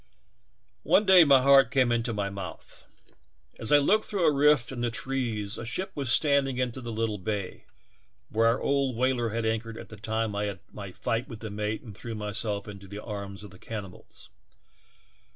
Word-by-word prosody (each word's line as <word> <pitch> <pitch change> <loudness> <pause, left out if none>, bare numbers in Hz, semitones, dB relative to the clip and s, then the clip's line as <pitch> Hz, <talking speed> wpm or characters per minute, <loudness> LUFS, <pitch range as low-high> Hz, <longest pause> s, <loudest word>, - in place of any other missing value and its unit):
"One 210 - +3
day 190 -3 +8
my 135 -3 +6
heart 140 0 +6
came 130 -3 +2
into 120 0 0
my 100 -2 -2
mouth! 95 -4 -9 0.7
As 110 - 0
I 145 - +8
looked 205 +10 +3
through 195 -5 -1
a 155 - +4
rift 145 -3 +3
in 125 -2 -5
the 120 - +1
trees 115 -4 -2
a - - -5
ship 120 +12 -3
was 135 -4 -1
standing 140 -3 +2
into 130 0 -2
the 120 -1 -6
little 110 -2 -2
bay 100 -1 -4 0.6
where 115 +1 +2
our 115 +2 +2
old 140 -3 0
whaler 125 -1 +1
had 115 +1 -2
anchored 110 0 -2
at - - -10
the 110 - -10
time 110 0 -2
I 105 0 -1
had 100 -3 -4
m^^ 100 -3 -8
fight 115 +3 -2
with 115 -3 -10
the 110 -2 -6
mate 105 +2 -3
and 110 -5 -10
threw 115 +3 -7
myself 105 -1 -3
into 100 -1 -10
the 100 +2 -8
arms 100 -1 -6
of 105 - -11
the 90 - -15
can 110 -2 -5
nibals. 90 -2 -13
115 Hz, 200 wpm, -27 LUFS, 105-130 Hz, 0.7 s, day